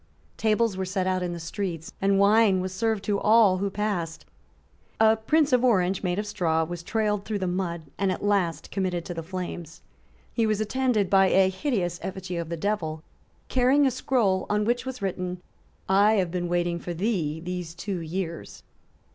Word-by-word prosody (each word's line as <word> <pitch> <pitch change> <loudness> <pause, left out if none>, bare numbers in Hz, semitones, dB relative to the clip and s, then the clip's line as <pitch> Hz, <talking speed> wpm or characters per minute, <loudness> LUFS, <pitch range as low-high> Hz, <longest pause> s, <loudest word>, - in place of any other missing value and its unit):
Tables 220 -1 +1
were 190 - -1
set 185 0 -1
out 185 0 0
in 180 -1 -2
the 170 - -5
streets; 165 -1 -5
and 195 0 +3
wine 200 -1 +5
was 185 0 -3
served 220 0 0
to 205 -1 0
all 215 -4 +5
who 200 +1 0
passed. 195 -5 -3 0.7
A 220 0 +6
Prince 285 +6 +2
of 250 0 +4
Orange, 195 -6 +2
made 180 -1 -1
of 210 - -1
straw, 170 -6 0
was 175 +1 -5
trailed 210 +2 -1
through 215 -1 -3
the 190 - -2
mud, 175 -2 -2 0.2
and 195 -1 +2
at 185 - -4
last 185 -7 0
committed 180 -3 -2
to 175 - -5
the 165 - -5
flames. 175 -2 -6 0.5
He 230 -2 +1
was 215 -1 +1
attended 220 -2 +1
by 195 0 +5
a 190 0 +4
hideous 190 - -2
effigy 185 -1 -5
of 170 -1 -4
the 170 - -3
devil, 160 -5 -2 0.4
carrying 260 +3 +3
a 265 - +3
scroll, 230 -7 +1
on 210 0 +1
which 245 +3 0
was 255 -5 -6
written, 180 -1 -3 0.5
"I 200 +3 +5
have 185 -5 +1
been 175 -1 -2
waiting 175 0 0
for 175 0 -5
thee 170 -6 -1
these 175 -1 -5
two 190 0 -4
years." 170 0 -5
190 Hz, 190 wpm, -26 LUFS, 175-215 Hz, 0.7 s, A